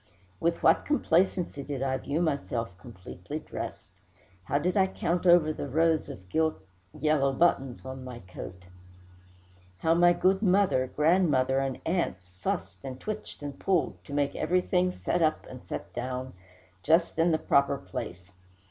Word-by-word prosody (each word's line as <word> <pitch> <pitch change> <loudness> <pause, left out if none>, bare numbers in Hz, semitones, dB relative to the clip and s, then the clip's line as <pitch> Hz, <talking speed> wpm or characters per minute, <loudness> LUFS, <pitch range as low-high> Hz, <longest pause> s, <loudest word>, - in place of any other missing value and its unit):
With 170 +7 0
what - - +5
complacency 180 - +1
did 135 -1 -4
I 130 -1 0
view 145 +6 -1
myself 120 - -2
completely 105 +4 -8
dressed! 155 - -7 0.5
How 140 - +1
did 180 +5 0
I 190 -2 +4
count 180 -1 -1
over 170 -3 +6
the 145 - -5
rows 160 +3 +2
of 95 - -8
yellow 160 0 +2 0.4
gilt 140 -3 +2
buttons 135 -8 +1
on 130 0 -7
my 125 -2 -7
coat! 90 0 -9 1.1
how 160 - +2
my 175 +1 +5
good 190 +2 +2
mother, 190 - +3
grandmother, 150 -4 +2
and 135 -2 -2
aunts 130 - -1
fussed, 95 +1 -4
and 130 -1 -6
twitched, 215 -6 -6
and 145 -1 -6
pulled, 185 -4 0
to 140 - -9
make 145 -1 0
everything 180 0 +1
set 175 -1 -1
up 155 -1 +1
and 130 -1 -10
set - - -6
down, 130 +1 -4 0.5
just 165 - +2
in 165 +2 +4
the 160 - +3
proper 140 -2 +2
place! 90 -2 -7
145 Hz, 155 wpm, -28 LUFS, 130-175 Hz, 1.1 s, over